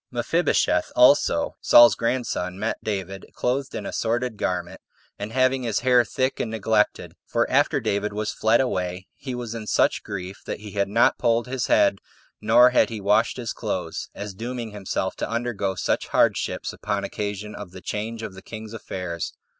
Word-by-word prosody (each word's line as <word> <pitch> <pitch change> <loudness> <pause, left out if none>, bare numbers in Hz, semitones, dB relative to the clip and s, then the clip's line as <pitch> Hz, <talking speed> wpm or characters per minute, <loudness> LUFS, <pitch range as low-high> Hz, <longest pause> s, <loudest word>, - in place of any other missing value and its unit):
3. - - -11
Mephibosheth - - +1
also, - - +4
Saul's 120 0 +8
grandson, 115 -7 -2
met 110 +3 -3
David, 95 -2 -4
clothed 130 +2 -1
in - - -4
a - - -5
sordid 120 +1 -1
garment, 90 -3 -3 0.4
and 100 +2 -5
having 130 +1 +2
his 115 -4 -1
hair 125 -1 +5
thick 130 +4 -1
and 115 - -1
neglected; 110 -1 0
for - - +1
after - - +3
David 100 +1 -1
was 105 +1 -3
fled 110 +2 +3
away, 90 -7 -2
he 130 -3 -6
was 120 -2 -5
in 110 -2 -6
such - - +2
grief 95 -2 -7
that - - -5
he 105 -1 -9
had 100 0 -1
not 115 +3 +3
polled 115 -1 +2
his 130 0 -2
head, 100 -1 +3 0.4
nor 120 +4 +6
had 125 - +4
he 110 -2 -5
washed 105 +5 +2
his 120 -3 -4
clothes, - - -4
as 100 0 -6
dooming 115 +2 -5
himself 95 -2 -3
to - - -3
undergo 115 -5 -2
such - - -1
hardships - - +1
upon - - -3
occasion 105 0 -4
of 100 -3 -8
the 95 +1 -11
change 110 +5 -4
of 95 - -6
the 95 - -11
king's 110 +1 -9
affairs. 90 -6 -5
110 Hz, 180 wpm, -24 LUFS, 100-120 Hz, 0.4 s, Saul's